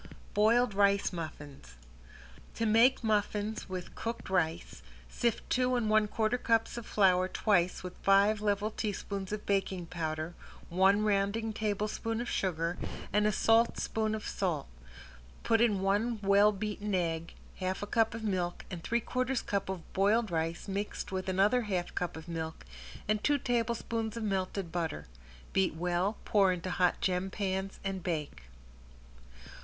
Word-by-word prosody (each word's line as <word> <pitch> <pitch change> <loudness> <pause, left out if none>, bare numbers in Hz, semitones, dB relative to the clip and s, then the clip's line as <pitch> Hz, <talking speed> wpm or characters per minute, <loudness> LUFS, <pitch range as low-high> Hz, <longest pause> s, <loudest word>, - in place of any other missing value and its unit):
~BOILED 230 +2 +4
RICE 200 -1 +3
MUFFINS~ 145 - -8 0.8
To 230 - -1
make 230 +4 +4
muffins 210 -1 -1
with 185 -1 -5
cooked 230 -4 -5
rice, 165 -4 -1 0.3
sift 235 - -1
two 255 0 +2
and 225 -3 0
one 215 -1 +4
quarter 220 +3 0
cups 225 -1 +1
of 235 -2 -7
flour 185 -3 +4
twice 185 -3 +1
with 180 -1 -7
five 200 +2 +4
level 210 +1 0
teaspoons 200 -2 -4
of 210 0 -4
baking 195 -3 0
powder, 160 -1 -3 0.4
one 195 +4 +4
rounding 210 +2 +1
tablespoon 215 +1 -2
of 240 - -3
sugar, 170 -4 -1 0.3
and 210 +1 +4
a - - +3
saltspoon 220 0 +2
of 215 - -6
salt. 170 -7 -1 0.8
Put 225 0 +3
in 210 -5 +3
one 210 +4 +1
well 200 +1 +5
beaten 210 0 -3
egg, 165 -2 -2 0.2
half 185 +1 -2
a - - -1
cup 225 +1 +1
of 225 - -6
milk, 180 -4 -2
and 170 -2 -6
three 235 +1 0
quarters 255 +2 -1
cup 200 -1 -2
of 185 -3 -6
boiled 210 +2 +2
rice 165 +2 -2
mixed 200 0 -4
with 190 0 -3
another 200 +7 +3
half 185 -6 -2
cup 180 -2 -3
of 160 +1 -10
milk, 160 - -5 0.4
and 215 0 +1
two 290 -1 +3
tablespoons 230 -2 -1
of 230 - -3
melted 190 -3 -2
butter. 160 - -3 0.5
Beat 190 -4 +2
well, 180 +5 0
pour 195 -3 +4
into 180 0 -3
hot 180 0 +2
gem 185 +1 0
pans 190 -1 -3
and 195 -1 -3
bake. 150 - -4
200 Hz, 150 wpm, -31 LUFS, 180-220 Hz, 0.8 s, well